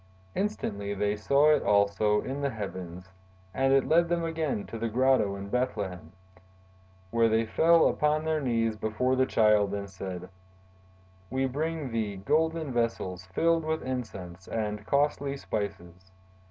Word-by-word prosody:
Instantly 100 Hz, -, -2 dB
they 105 Hz, +1 st, 0 dB
saw 140 Hz, +8 st, +4 dB
it 150 Hz, -, +2 dB
also 105 Hz, +1 st, +2 dB
in 135 Hz, +2 st, -4 dB
the 140 Hz, -, +1 dB
heavens 95 Hz, -5 st, -7 dB, 0.4 s
and 135 Hz, +4 st, +2 dB
it 135 Hz, -1 st, +3 dB
led 170 Hz, +1 st, +4 dB
them 170 Hz, -1 st, 0 dB
again 160 Hz, -9 st, -2 dB
to 115 Hz, -, -7 dB
the 115 Hz, 0 st, -1 dB
grotto 125 Hz, -4 st, +2 dB
in 100 Hz, 0 st, -7 dB
Bethlehem, 100 Hz, -6 st, -3 dB, 1.0 s
where 115 Hz, -1 st, +3 dB
they 110 Hz, +1 st, +2 dB
fell 165 Hz, +9 st, +4 dB
upon 150 Hz, +1 st, +1 dB
their 160 Hz, -1 st, 0 dB
knees 115 Hz, -4 st, 0 dB
before 110 Hz, +4 st, 0 dB
the 130 Hz, 0 st, +2 dB
Child 105 Hz, -3 st, +3 dB
and 100 Hz, 0 st, -4 dB
said: 90 Hz, -1 st, -7 dB, 1.0 s
'We 130 Hz, +2 st, 0 dB
bring 155 Hz, 0 st, -3 dB
thee 110 Hz, -3 st, -2 dB
golden 160 Hz, +8 st, 0 dB
vessels 95 Hz, -6 st, -2 dB
filled 165 Hz, -, +1 dB
with 160 Hz, 0 st, -2 dB
incense 95 Hz, -9 st, -6 dB
and 105 Hz, -1 st, -3 dB
costly 140 Hz, -1 st, +1 dB
spices. 95 Hz, -6 st, -5 dB
115 Hz, 145 wpm, -28 LUFS, 100-140 Hz, 1.0 s, saw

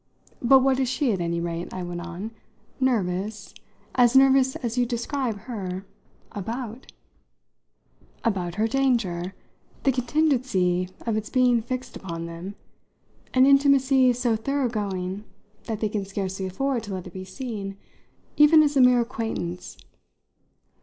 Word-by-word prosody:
But 260 Hz, +2 st, +6 dB
what 265 Hz, -1 st, +3 dB
is 260 Hz, -2 st, +1 dB
she, 260 Hz, -1 st, +1 dB
at 185 Hz, -, -2 dB
any 170 Hz, 0 st, -1 dB
rate," 170 Hz, 0 st, -4 dB
I 185 Hz, -, -5 dB
went 175 Hz, 0 st, -5 dB
on, 180 Hz, +5 st, -6 dB, 0.5 s
"nervous 205 Hz, -4 st, -1 dB, 0.4 s
as 245 Hz, 0 st, +4 dB
nervous 265 Hz, -1 st, +5 dB
as 235 Hz, -2 st, -3 dB
you 250 Hz, -, +3 dB
describe 235 Hz, -2 st, -2 dB
her 195 Hz, -5 st, -5 dB, 0.5 s
about?" 230 Hz, +4 st, -6 dB, 1.3 s
"About 185 Hz, -7 st, -1 dB
her 215 Hz, +2 st, +1 dB
danger; 225 Hz, -9 st, 0 dB, 0.5 s
the 275 Hz, -, +4 dB
contingency 250 Hz, -, +1 dB, 0.2 s
of 225 Hz, -2 st, 0 dB
its 215 Hz, -, -4 dB
being 250 Hz, -2 st, +3 dB
fixed 255 Hz, +3 st, -5 dB
upon 170 Hz, -3 st, -6 dB
them 170 Hz, +4 st, -7 dB, 0.8 s
an 255 Hz, 0 st, +7 dB
intimacy 275 Hz, -2 st, +5 dB
so 240 Hz, -1 st, +1 dB
thoroughgoing 210 Hz, -7 st, -2 dB, 0.4 s
that 220 Hz, -2 st, -4 dB
they 215 Hz, -, +1 dB
can 205 Hz, -1 st, -2 dB
scarcely 195 Hz, -1 st, -3 dB
afford 260 Hz, +6 st, -1 dB
to 205 Hz, -3 st, -5 dB
let 185 Hz, -, -6 dB
it 180 Hz, -, -10 dB
be 185 Hz, -, -6 dB
seen 195 Hz, -1 st, -6 dB, 0.6 s
even 310 Hz, +1 st, +7 dB
as 295 Hz, -1 st, 0 dB
a 270 Hz, -, +5 dB
mere 250 Hz, -1 st, +6 dB
acquaintance. 225 Hz, -7 st, -4 dB
225 Hz, 140 wpm, -25 LUFS, 185-260 Hz, 1.3 s, an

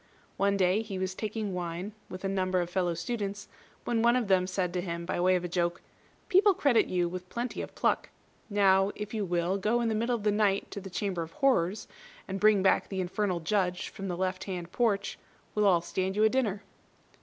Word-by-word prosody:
One 200 Hz, 0 st, +2 dB
day 190 Hz, +2 st, +3 dB
he 210 Hz, -4 st, -5 dB
was 185 Hz, 0 st, -2 dB
taking 215 Hz, 0 st, -3 dB
wine 175 Hz, +2 st, -4 dB, 0.2 s
with 185 Hz, +1 st, -8 dB
a -, -, +2 dB
number 185 Hz, -1 st, 0 dB
of 175 Hz, 0 st, -2 dB
fellow 175 Hz, -2 st, 0 dB
students, 200 Hz, +2 st, -4 dB, 0.4 s
when 235 Hz, -2 st, +1 dB
one 235 Hz, +1 st, +4 dB
of 240 Hz, -5 st, 0 dB
them 185 Hz, -1 st, +3 dB
said 185 Hz, -2 st, -1 dB
to 180 Hz, -, -1 dB
him, 170 Hz, -1 st, -4 dB
by 175 Hz, -, -2 dB
way 185 Hz, +1 st, +4 dB
of 180 Hz, -, -1 dB
a -, -, -2 dB
joke, 175 Hz, 0 st, -1 dB, 0.5 s
"People 395 Hz, +1 st, +5 dB
credit 275 Hz, -8 st, +3 dB
you 175 Hz, -1 st, +1 dB
with 180 Hz, +1 st, -7 dB
plenty 240 Hz, +1 st, -3 dB
of -, -, -8 dB
pluck. -, -, +1 dB, 0.4 s
Now, 195 Hz, -1 st, +4 dB
if 210 Hz, +1 st, -6 dB
you 215 Hz, -2 st, -1 dB
will 175 Hz, +2 st, 0 dB
go 220 Hz, +4 st, +1 dB
in 235 Hz, -1 st, +1 dB
the -, -, 0 dB
middle 235 Hz, +3 st, +1 dB
of 220 Hz, -, -5 dB
the 210 Hz, -, +3 dB
night 205 Hz, -1 st, +1 dB
to 200 Hz, -, -5 dB
the 195 Hz, -, -8 dB
Chamber 185 Hz, -1 st, -2 dB
of 165 Hz, 0 st, -7 dB
Horrors, 210 Hz, -8 st, +1 dB, 0.4 s
and 195 Hz, 0 st, -3 dB
bring 210 Hz, -2 st, +5 dB
back 190 Hz, -, +3 dB
the 190 Hz, -, -3 dB
Infernal 185 Hz, -1 st, -1 dB
Judge 180 Hz, 0 st, 0 dB
from 195 Hz, -, -7 dB
the 175 Hz, -2 st, -3 dB
left 185 Hz, 0 st, -2 dB
hand 180 Hz, -3 st, -5 dB
porch, 200 Hz, -4 st, 0 dB, 0.3 s
we'll 210 Hz, -1 st, +3 dB
all 175 Hz, -3 st, +4 dB
stand 190 Hz, +2 st, -2 dB
you 210 Hz, -, +3 dB
a 220 Hz, -, +6 dB
dinner." 215 Hz, -5 st, 0 dB
195 Hz, 225 wpm, -29 LUFS, 180-210 Hz, 0.5 s, a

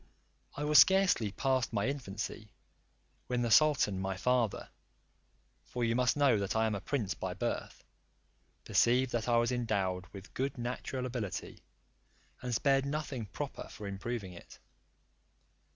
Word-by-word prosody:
I 145 Hz, -, -4 dB
was 150 Hz, 0 st, +6 dB
scarcely 190 Hz, -, +5 dB
past 130 Hz, +3 st, 0 dB
my 100 Hz, +1 st, 0 dB
infancy, 110 Hz, -5 st, -5 dB, 0.8 s
when 125 Hz, -1 st, 0 dB
the 120 Hz, -, -1 dB
sultan 140 Hz, -10 st, +4 dB
my 95 Hz, 0 st, -2 dB
father 125 Hz, 0 st, 0 dB, 0.9 s
(for 125 Hz, -, -4 dB
you 115 Hz, 0 st, +1 dB
must 125 Hz, +2 st, +2 dB
know 130 Hz, -8 st, +3 dB
I 110 Hz, 0 st, +3 dB
am 110 Hz, -, 0 dB
a 100 Hz, -, -3 dB
prince 110 Hz, -9 st, -1 dB
by -, -, -5 dB
birth) -, -, -4 dB, 0.8 s
perceived 125 Hz, +2 st, +3 dB
that 120 Hz, 0 st, -1 dB
I 120 Hz, -, +4 dB
was 120 Hz, +1 st, +2 dB
endowed 100 Hz, -7 st, -1 dB
with 100 Hz, 0 st, -12 dB
good 135 Hz, +1 st, -2 dB
natural 125 Hz, +1 st, -4 dB
ability, 120 Hz, -6 st, -5 dB, 0.8 s
and 125 Hz, -, -4 dB
spared 135 Hz, +3 st, +2 dB
nothing 140 Hz, -6 st, -3 dB
proper 90 Hz, -, -6 dB
for 105 Hz, -, -9 dB
improving 100 Hz, 0 st, -4 dB
it. 85 Hz, -, -13 dB
120 Hz, 140 wpm, -32 LUFS, 105-130 Hz, 0.9 s, was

